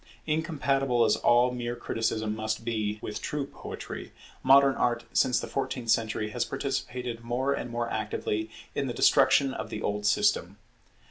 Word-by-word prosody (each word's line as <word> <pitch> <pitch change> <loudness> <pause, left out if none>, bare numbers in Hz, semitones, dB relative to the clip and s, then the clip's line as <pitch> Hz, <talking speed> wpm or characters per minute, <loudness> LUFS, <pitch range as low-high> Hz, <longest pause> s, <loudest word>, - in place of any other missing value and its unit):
Incompatible 140 -6 +1
as - - +3
all 120 +1 +4
mere 120 -1 -3
criticism 110 -2 -2
must 110 +1 -3
be 110 -3 -1
with 105 0 -5
true 150 -2 -2
poetry, - - -8 0.3
modern 135 +1 +6
Art 120 -2 0
since 125 -3 +3
the - - -4
fourteenth 125 -4 -2
century 110 -1 0
has 120 +1 0
participated 125 -3 -3
more 125 +4 0
and 125 - -4
more 120 0 -2
actively 110 0 -2 0.2
in - - -1
the - - -4
destruction 135 -2 +4
of - - -5
the 110 - -5
old 105 0 -1
system. 105 -2 +2
120 Hz, 155 wpm, -28 LUFS, 110-135 Hz, 0.3 s, modern